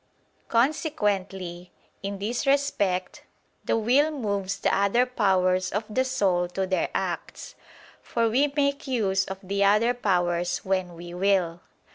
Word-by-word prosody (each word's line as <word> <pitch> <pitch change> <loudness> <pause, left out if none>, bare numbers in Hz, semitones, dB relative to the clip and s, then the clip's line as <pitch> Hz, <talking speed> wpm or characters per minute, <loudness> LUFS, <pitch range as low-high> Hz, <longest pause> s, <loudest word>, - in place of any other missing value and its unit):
Consequently, 200 - -1 0.3
in 200 0 -4
this 230 +7 -3
respect, 205 -10 0 0.4
the - - +1
will 255 +7 +3
moves 200 -9 -2
the - - +1
other 200 +5 +3
powers 185 -6 +1
of 210 +3 -1
the 255 +4 0
soul 190 -9 +1
to 190 +2 -2
their 185 0 0
acts, - - -4 0.5
for 230 -1 0
we 275 +6 +2
make 280 0 0
use 195 -7 +1
of 190 - -6
the 200 +1 0
other 215 +4 +4
powers 175 -6 0
when 185 -2 -1
we 175 +1 -9
will. 180 -2 +1
200 Hz, 135 wpm, -26 LUFS, 185-240 Hz, 0.5 s, other